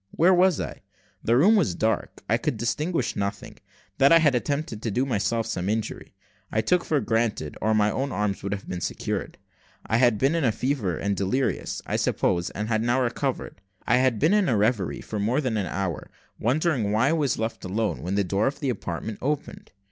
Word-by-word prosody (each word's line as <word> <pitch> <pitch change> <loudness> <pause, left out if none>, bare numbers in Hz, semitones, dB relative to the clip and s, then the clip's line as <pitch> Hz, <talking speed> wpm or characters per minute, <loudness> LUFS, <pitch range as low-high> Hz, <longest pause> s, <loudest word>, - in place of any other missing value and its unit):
Where 175 - +4
was 180 -1 +4
I? - - -5 0.4
The 115 +2 +3
room 200 - +6
was 155 - +2
dark, 110 +4 -1
I - - +3
could 115 - -2
distinguish 140 +5 -1
nothing; 100 -1 -4 0.4
that 140 +2 +6
I 165 - +9
had 155 -4 +4
attempted 125 -2 -2
to 115 - -2
do 125 +6 0
myself 115 -1 0
some 95 -4 -2
injury, 110 0 -3 0.4
I 110 - +1
took 180 +8 +2
for 150 - +1
granted, 110 -8 -1
or 110 +1 +2
my 105 0 +3
arms 105 -7 -2
would 100 - -4
not 100 -1 -2
have - - -20
been 90 -1 -4
secured. - - -3 0.5
I 110 - +1
had 120 -3 +4
been 135 +7 +2
in 165 -2 0
a 115 - +3
fever 110 - -1
and 100 0 -1
delirious, 115 +8 -1
I - - -1
supposed, 85 -1 0
and 105 +2 -3
had 110 -1 +1
now 120 +3 +2
recovered. 125 -4 -2 0.2
I 120 - +3
had 130 -3 +2
been 155 - +3
in 210 -5 +3
a 115 - +2
reverie 100 - 0
for 105 - -5
more 115 +7 +1
than 130 -6 -1
an 100 -4 -1
hour, 90 0 -3 0.3
wondering 130 - +1
why 115 +6 +3
I - - +2
was 150 -5 +1
left 110 +1 -3
alone, 105 +4 -2
when 90 +3 -2
the 100 - +2
door 100 +5 0
of 140 +1 -3
the 140 -4 0
apartment 100 0 -5
opened. 145 +2 -3
115 Hz, 210 wpm, -25 LUFS, 100-135 Hz, 0.5 s, I